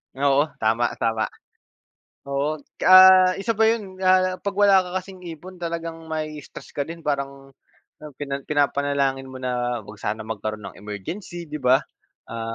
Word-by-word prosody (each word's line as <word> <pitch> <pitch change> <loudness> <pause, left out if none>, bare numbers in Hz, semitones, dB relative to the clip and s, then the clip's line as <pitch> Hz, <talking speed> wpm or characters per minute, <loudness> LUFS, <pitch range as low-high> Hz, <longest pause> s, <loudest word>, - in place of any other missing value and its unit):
Oo, 140 +2 +3 0.2
tama, 115 +2 +1
tama. 115 -1 +1 1.1
Oo, 140 +2 0 0.3
ah, 185 0 +9
isa 215 +2 -2
pa 220 - +5
'yon, 210 -5 -1
ah, 185 0 +3
'pag 200 0 -4
wala 195 -2 +5
ka - - -8
kasing 190 -1 -12
ipon, 175 +3 -9
talagang 165 -1 -5
mai-i-stress 155 -2 -6
ka 145 - -3
din. 165 0 -9
Parang 140 -2 -3 0.7
pina 140 -1 -3
pinapanalangin 140 -2 0
mo 130 0 -9
na, 125 -1 -2
huwag 105 0 -12
sana 110 +2 -3
magkaroon 110 -1 -5
ng - - -17
emergency, 165 - -7
'di 150 - -4
ba. 130 -1 +3 0.5
Ah, 115 0 -4
145 Hz, 150 wpm, -23 LUFS, 125-185 Hz, 1.1 s, ah